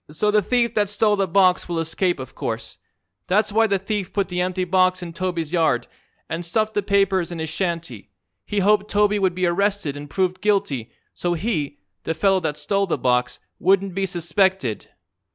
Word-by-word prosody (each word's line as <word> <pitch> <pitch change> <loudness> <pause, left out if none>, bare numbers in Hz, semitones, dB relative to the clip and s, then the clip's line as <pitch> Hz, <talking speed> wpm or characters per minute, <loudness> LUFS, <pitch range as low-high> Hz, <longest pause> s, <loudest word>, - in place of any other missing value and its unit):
"So 210 +8 0
the 210 0 +4
thief 240 +3 +1
that 205 -2 +1
stole 210 0 +2
the 195 -1 0
box 185 0 +3
will 170 - -2
escape, 170 +2 0
of 130 - -8
course. - - -5 0.5
That's 210 +3 +2
why 225 +2 +3
the 200 -2 +2
thief 195 -1 -3
put 200 -2 -1
the 180 0 -1
empty 185 0 -1
box 185 0 +2
in 170 -1 -7
Toby's 170 -3 -3
yard, 155 -8 +2 0.4
an' 165 +1 -3
stuffed 215 +6 -1
the 205 - +1
papers 195 -3 +1
in 170 - -5
his 160 -1 -4
shanty. 165 - -3 0.3
He 205 - -1
hoped 210 +1 +3
Toby 210 0 +2
would 190 -3 +1
be 185 0 0
arrested 195 -4 0
an' 145 0 -8
proved 185 +3 -1
guilty, 195 - 0 0.2
so 175 -1 -1
he 160 -7 -2 0.2
the 160 - -3
fellow 195 +2 +3
that 150 -4 -3
stole 200 -1 0
the 165 - 0
box 125 -1 +1 0.2
wouldn't 195 0 +2
be 195 +1 -1
suspected." 175 - 0
185 Hz, 190 wpm, -22 LUFS, 165-200 Hz, 0.5 s, the